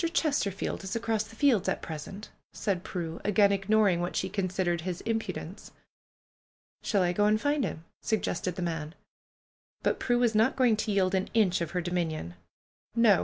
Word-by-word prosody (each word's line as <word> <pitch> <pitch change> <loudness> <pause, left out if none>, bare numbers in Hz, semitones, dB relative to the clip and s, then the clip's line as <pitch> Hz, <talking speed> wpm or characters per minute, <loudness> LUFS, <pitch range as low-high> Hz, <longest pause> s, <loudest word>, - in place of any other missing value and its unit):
Chesterfield 205 - 0
is 195 +3 -4
across 225 -2 0
the 225 - -14
fields 225 -8 +3
at - - -2
present," 165 +6 -7 0.2
said 190 -4 -1
Prue, 170 -3 -5
again 205 0 +4
ignoring 200 -2 +3
what 175 - -3
she 190 - 0
considered 185 -3 -1
his 180 0 -4
im 225 0 +1
pudence. - - -7 1.1
^^Shall 200 -3 +2
I 175 -1 +2
go 205 +3 +2
and 215 +1 +3
find 285 +2 +1
him?" 160 -7 -4 0.2
suggested 185 -5 -1
the 180 - -3
man. 160 -1 -3 0.9
But - - +1
Prue 245 -1 +2
was 240 -2 +3
not 220 +5 +3
going 250 -4 +4
to 215 0 -1
yield 190 -2 +2
an 190 0 0
inch 190 -6 +3
of 170 - -1
her - - +1
do 175 +1 -4
minion. 160 - -2 0.6
"No!" 230 -5 +5
195 Hz, 180 wpm, -29 LUFS, 175-220 Hz, 1.1 s, No